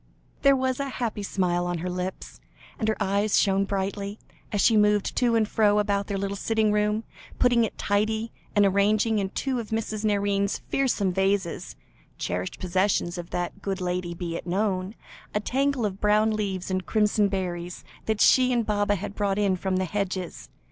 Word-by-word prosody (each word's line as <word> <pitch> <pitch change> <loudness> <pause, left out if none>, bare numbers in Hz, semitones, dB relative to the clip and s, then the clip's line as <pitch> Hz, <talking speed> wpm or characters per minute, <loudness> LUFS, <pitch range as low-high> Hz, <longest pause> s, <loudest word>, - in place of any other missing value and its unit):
There 275 -1 +6
was 260 0 0
a 280 0 -2
happy 230 -5 -3
smile 175 -3 0
on 175 0 -1
her 170 +3 -4
lips, 180 +1 -5 0.4
and 220 - -1
her 220 - +1
eyes 200 +2 +1
shone 195 -1 +2
brightly, 200 +1 -3 0.3
as 205 - -1
she 225 - +5
moved 210 -1 +3
to 240 -2 +3
and 220 -2 +3
fro 210 -1 +3
about 200 -1 +1
their 200 - -2
little 200 0 -2
sitting 220 +1 +1
room, 210 +1 +1 0.3
putting 245 -2 +4
it - - -7
tidy, 220 +2 0 0.2
and 205 -1 +5
arranging 210 +3 +2
in 195 -1 -1
two 260 +4 -2
of 225 - -6
Mrs. 220 -1 -2
Nairne's 200 -1 +1
fearsome 220 -9 +1
vases 190 -2 -1 0.4
(cherished 90 +1 -3
possessions 185 -1 0
of 170 0 -7
that 180 +3 -4
good 195 -1 -2
lady, 180 -1 -2
be 170 -1 -4
it - - -6
known) 190 +1 -1 0.4
a - - +3
tangle 270 +2 0
of 195 -1 -4
brown 210 +1 +3
leaves 195 -4 -2
and 185 0 -2
crimson 210 -1 +3
berries, 180 -3 -4 0.2
that 220 -1 0
she 255 -1 +5
and 240 -2 +1
Baba 205 -1 +1
had 200 +1 -5
brought 200 -1 0
in 200 -2 +2
from 185 +1 -2
the 185 0 +1
hedges. 185 -1 -4
205 Hz, 180 wpm, -26 LUFS, 190-215 Hz, 0.4 s, There